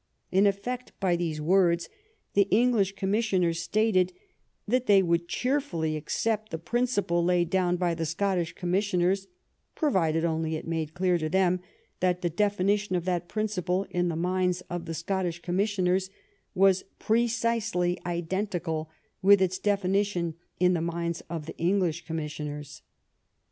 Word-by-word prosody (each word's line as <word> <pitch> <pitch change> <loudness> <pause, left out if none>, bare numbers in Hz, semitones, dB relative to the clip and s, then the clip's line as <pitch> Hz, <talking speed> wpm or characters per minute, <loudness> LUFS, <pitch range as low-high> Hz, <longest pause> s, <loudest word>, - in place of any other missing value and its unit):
In 195 +2 +5
effect, 245 +6 -3
by 185 -3 +2
these 165 -3 -2
words 170 +1 +3 0.5
the 200 -1 +4
English 215 -4 +3
commis 195 +3 +1
sioners 175 -4 +2
stated 185 +1 +2 0.6
that 255 +3 +1
they 195 -2 +6
would 170 -1 +1
cheerfully 245 - -1
accept 215 +8 -1
the 160 - -3
principle 205 -3 0
laid 175 -1 +2
down 180 -2 +2
by 175 -1 +1
the 165 -1 -2
Scottish 180 0 -1
commissioners, 190 +1 0 0.5
provided 170 - +1
only 160 -1 -1
it 155 - -5
was 165 - -4
made 160 -1 -3
clear 180 -1 +2
to 155 -1 -2
them 185 0 +2 0.4
that 180 0 +1
the 175 - 0
defi 205 +2 +1
nition 200 -1 +1
of 175 - -4
that 175 -2 -1
principle 195 -3 -1
in 175 0 +1
the 170 - -1
minds 180 +1 0
of 175 -1 -3
the 165 - -4
Scottish 175 0 -2
commissioners 190 0 +1 0.5
was 190 0 +4 0.2
precisely 225 -5 +1
identical 175 -2 -2 0.3
with 200 +1 +7
its 185 0 0
defini 200 -1 +2
tion 175 -5 -3 0.3
in 180 0 +4
the 170 - 0
minds 170 0 -2
of 165 -3 -4
the 160 - -8
English 175 -1 0
commissioners. 150 -2 -5
180 Hz, 150 wpm, -27 LUFS, 170-200 Hz, 0.6 s, with